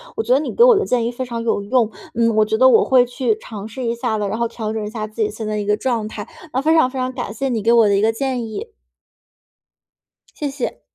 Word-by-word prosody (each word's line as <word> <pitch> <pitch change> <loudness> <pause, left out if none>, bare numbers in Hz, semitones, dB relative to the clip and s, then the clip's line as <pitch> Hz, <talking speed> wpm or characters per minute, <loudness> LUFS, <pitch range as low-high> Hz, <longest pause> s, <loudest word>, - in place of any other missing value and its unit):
我 - - -1
觉 - - +2
得 - - +3
你 300 - -4
给 470 - +5
我 - - +7
的 420 - 0
建 245 -2 +1
议 235 - -1
非 255 +2 -5
常 235 -2 -5
有 225 -3 0
用， 230 +1 +2 0.2
嗯， 230 -1 +1
我 215 - +4
觉 215 - -1
得 260 +3 +6
我 - - +5
会 255 -2 +5
去 245 -2 -1
尝 210 -1 -9
试 240 +4 -7
一 235 -1 -1
下 235 -2 -2
的， 205 -1 -1
然 215 - -3
后 235 0 0
调 220 -2 -5
整 220 -1 -3
一 - - -4
下 215 -1 -4
自 215 +2 -16
己 210 - -1
现 215 0 -6
在 215 - -2
一 205 - -2
个 210 +1 +2
状 230 -2 -2
态， 215 0 -7 0.3
那 260 - +1
非 315 +3 +3
常 285 -5 +4
非 265 - -5
常 255 0 -1
感 245 -5 -5
谢 270 +5 -2
你 225 -4 -2
给 230 +2 +4
我 230 -3 +5
的 200 - +3
一 195 - +2
个 220 +1 +3
建 255 0 -2
议。 410 - -6 1.7
谢 290 -2 -3
谢。 275 -2 -5
235 Hz, 305 characters per minute, -20 LUFS, 215-255 Hz, 1.7 s, 我